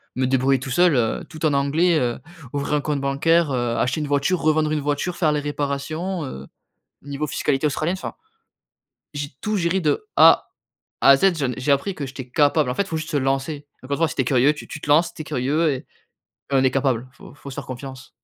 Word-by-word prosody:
me 130 - 0
débrouiller 135 0 +2
tout 130 - -7
seul, 175 +4 +4
heu, 115 -3 0
tout 160 -1 -5
en 150 - +2
anglais, 155 +5 +2
heu, 120 -1 -1 0.3
ouvrir 140 +1 -2
un 145 - +1
compte 145 -1 -1
bancaire, 150 +3 +2
heu, 120 -2 -1
acheter 130 +5 0
une 150 - -3
voiture, 145 +5 +1
revendre 155 0 +2
une 155 - 0
voiture, 145 +5 -2
faire 155 -4 +2
les 150 - 0
réparations, 150 +4 -3
heu, 70 - -8 0.6
niveau 145 +2 -4
fiscalité 145 0 0
Australienne, 155 +5 -1
enfin. - - -6 1.0
J'ai 145 0 -3
tout 215 0 -1
géré 180 +1 +1
de 155 - 0
A - - +6 0.5
à 140 - +7
Z. 195 +7 +3
J'en 130 -4 0
ai - - -7
j'ai 140 +3 +2
appris 140 +8 0
que 140 -5 -5
j'étais 130 -1 -8
capable. 145 0 +2
En 125 - -2
fait, 200 - 0
faut 160 - -3
juste 155 0 -5
se 150 - -1
lancer. 135 +2 -1 0.2
Encore 135 +2 -3
une - - -4
fois, 165 -1 +2
si - - -6
tu 135 - +2
es - - -5
curieux, 130 +3 +3
tu 150 - -10
tu 150 - -7
te - - -8
lances, 165 +3 +4
tu - - -6
es - - -11
curieux 150 +3 0
et - - -1 0.8
et 140 - +2
on 130 - +4
est 130 - +3
capable. 130 -3 0
Faut - - -14
faut 140 - -10
se 130 - -8
faire 145 -3 -6
confiance. 130 0 -8
145 Hz, 235 wpm, -22 LUFS, 135-155 Hz, 1.0 s, à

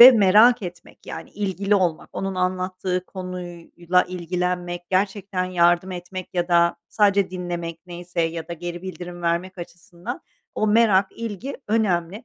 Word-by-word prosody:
Ve 250 +2 +14
merak 215 +1 +6
etmek, 175 -1 -9
yani, - - -7
ilgili 200 0 0
olmak. 175 -5 +1
Onun 195 -1 -3
anlattığı 185 0 -1
konuyla 180 -1 -2
ilgilenmek, 180 0 -3
gerçekten 195 0 0
yardım 175 0 +3
etmek 180 +1 -7
ya 175 0 0
da 170 0 +4
sadece 200 -3 +3
dinlemek 175 -2 -4
neyse 175 0 -4
ya 165 0 -2
da - - -4
geri 175 +1 -6
bildirim 180 -2 -7
vermek 175 +3 -1
açısından 175 +6 -8 0.3
o 215 - +1
merak, 210 -3 +5
ilgi 230 +4 -5
önemli. 200 -2 0
180 Hz, 135 wpm, -23 LUFS, 175-195 Hz, 0.3 s, Ve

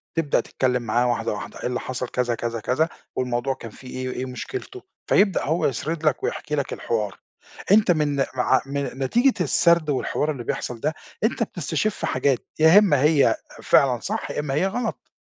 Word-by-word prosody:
تبدأ 165 -3 +2
تتكلّم 125 -2 0
معاه 120 +2 +1
واحدة، 115 -2 0
واحدة، 105 - -7
إيه - - -2
اللي 125 0 -2
حصَل 125 -1 -4
كذا، 120 -1 -1
كذا، 115 0 -3
كذا 130 +9 +1 0.3
والموضوع 125 +1 -1
كان 115 -3 -10
فيه 130 - -14
إيه، 130 0 -4
إيه 130 - -3
مشكلته، 380 - -6 0.3
فيبدأ 195 -3 +3
هو 160 +4 +1
يسرِد 155 +5 -2
لك 150 - +1
ويحكِ - - -4
لك 145 -2 -1
الحوار، 105 -4 -2 0.5
أنت 210 -2 +6
من 150 -3 +1 0.2
مع 130 +1 +3
من 140 +1 -2 0.2
نتيجة 240 - +3
السرد 170 +2 +3
والحوار 145 +2 0
اللي 125 -5 -6
بيحصَل 120 0 -3
ده 155 +5 -1 0.3
أنت 230 +1 +1
بتستشِف 180 +2 -2
حاجات 130 0 +1 0.2
يا 160 +4 +7
إمّا 150 -10 +3
هي 150 -1 +4 0.3
فعلًا 130 -4 +4
صح، 215 - -3
يا - - -3
إمّا 150 -2 -2
هي 170 +7 +2
غلط. 225 +2 -4
140 Hz, 180 wpm, -23 LUFS, 125-165 Hz, 0.5 s, يا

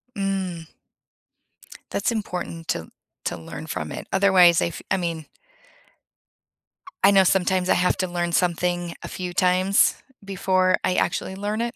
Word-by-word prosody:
Mm. 190 -4 -3 1.2
That's - - 0
important 180 -6 -5
to 80 - -2 0.4
to - - -2
learn 80 -1 -8
from 75 0 -4
it. - - -7
Otherwise, 190 -3 +5
I - - +1
f 170 - -7
I 190 - +3
mean 165 -3 -3 1.8
I 200 - +7
know 195 -1 +5
sometimes 185 0 +2
I - - +4
have 180 0 +1
to 185 - -1
learn 175 -1 -2
something 175 0 0
a - - -6
few 180 -1 -5
times 185 +2 +3 0.2
before 185 -1 +1
I - - +1
actually 190 - -1
learn 205 +2 -3
it. 235 +1 -2
180 Hz, 150 wpm, -23 LUFS, 175-195 Hz, 1.8 s, I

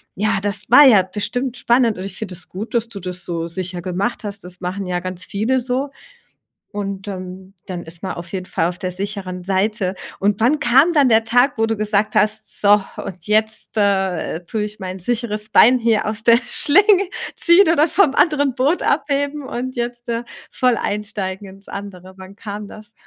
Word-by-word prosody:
Ja, 210 0 +1
das 205 0 -3
war 285 +4 +9
ja 210 -8 +7
bestimmt 245 +6 -4
spannend 235 -3 +2
und - - -5
ich 195 - -8
finde 200 -4 -6
das - - -7
gut, 210 +7 -7
dass 235 -1 0
du 210 -4 -8
das 180 0 -7
so 165 -2 -3
sicher 175 0 -5
gemacht 195 +6 -2
hast. 200 -2 -6
Das 180 0 -8
machen 185 +1 -4
ja 180 -1 -2
ganz 185 0 -5
viele 230 +6 0
so. 260 +3 -1 0.8
Und, 200 -1 -5
ähm, 185 0 -8
dann 180 -2 -6
ist 165 +1 -10
man 190 - -3
auf 170 +1 -9
jeden 185 -1 -4
Fall 165 -3 -1
auf 175 - -5
der 185 - -3
sicheren 185 -1 -5
Seite. 195 0 0 0.2
Und 205 +1 0
wann 260 +7 +3
kam 275 +8 +4
dann 285 -5 +4
der 225 -1 +4
Tag, 245 +3 +3
wo 225 - +1
du 225 0 0
gesagt 210 0 0
hast: 215 0 +1
„So, 205 0 +5 0.2
und 180 -2 -9
jetzt, 220 +1 0
äh, 190 -4 0
tue 210 +5 -3
ich 210 0 -7
mein 185 -1 -6
sicheres 215 +1 -3
Bein 245 +4 +6
hier 230 -2 +1
aus 215 +1 -3
der 235 0 +6
Schlinge, 385 - +4 0.3
ziehen 345 +1 +5
oder 315 0 +3
vom 320 -5 +3
anderen 285 -6 +2
Boot 280 +7 +1
abheben 285 0 0
und 255 +1 -5
jetzt, 240 0 -4
äh, 230 +1 -2 0.3
voll 250 -2 +2
einsteigen 205 -2 -4
ins 195 +1 -15
andere.“ 190 -2 -8
Wann 190 +2 -12
kam 205 0 -7
das? 215 +1 -13
210 Hz, 195 wpm, -19 LUFS, 190-240 Hz, 0.8 s, war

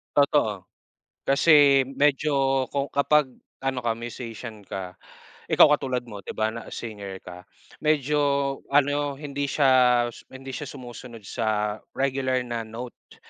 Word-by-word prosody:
Totoo. 140 -9 +2 0.6
Kasi 140 -1 +6
medyo 135 -1 +1
kung 140 0 -1
kapag 145 0 +3 0.3
ano 135 -1 -1
ka 115 - +2
musician 115 -2 -8
ka, 90 -2 -6 0.5
ikaw - - +7
katulad 125 -2 -2
mo, 105 -4 -9
di - - -8
ba? 110 0 0
Na 115 0 -8
singer 100 -4 -7
ka, 90 0 -9 0.4
medyo 150 -1 +1 0.5
ano 145 0 +2
hindi 140 -1 -4
siya 140 -2 +2 0.6
hindi 135 0 -10
siya 145 +1 -5
sumusunod 120 -3 -10
sa 105 0 -1 0.2
regular 130 -1 0
na 120 -1 -3
note 120 +2 -10
130 Hz, 125 wpm, -25 LUFS, 115-140 Hz, 0.6 s, ikaw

